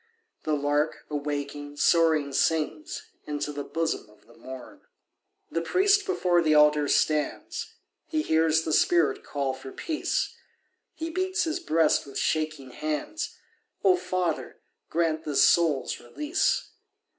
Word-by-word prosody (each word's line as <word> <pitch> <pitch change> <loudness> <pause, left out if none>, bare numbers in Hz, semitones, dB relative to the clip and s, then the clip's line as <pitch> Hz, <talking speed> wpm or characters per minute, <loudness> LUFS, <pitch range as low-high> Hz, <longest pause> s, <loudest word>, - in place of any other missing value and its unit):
The 155 - +1
lark, 145 +2 0
awaking, 145 0 -4
soaring 155 -4 +3
sings 155 +1 -1 0.2
Into 150 0 -2
the 145 0 -4
bosom 165 -9 -2
of 105 0 -23
the 115 - -19
morn. 130 +1 -10 0.7
The 165 - 0
priest 395 - +3
before 180 - +2
the 155 -2 +3
altar 150 -1 +5
stands, 150 +1 0 0.3
He 310 -1 -1
hears 160 - +3
the 160 - -1
spirit 170 -1 +3
call 140 -2 -2
for 130 0 -9
peace; 315 -2 -2 0.6
He 325 0 -4
beats 375 +2 0
his 320 -1 -1
breast 160 -2 +2
with 135 - -7
shaking 155 -4 -1
hands. 155 - -4 0.5
"O 190 -2 +6
Father, 180 -2 -2 0.3
grant 160 -1 0
this 145 -3 +3
soul's 160 -6 +3
release. 300 - -1
155 Hz, 130 wpm, -27 LUFS, 145-175 Hz, 0.7 s, O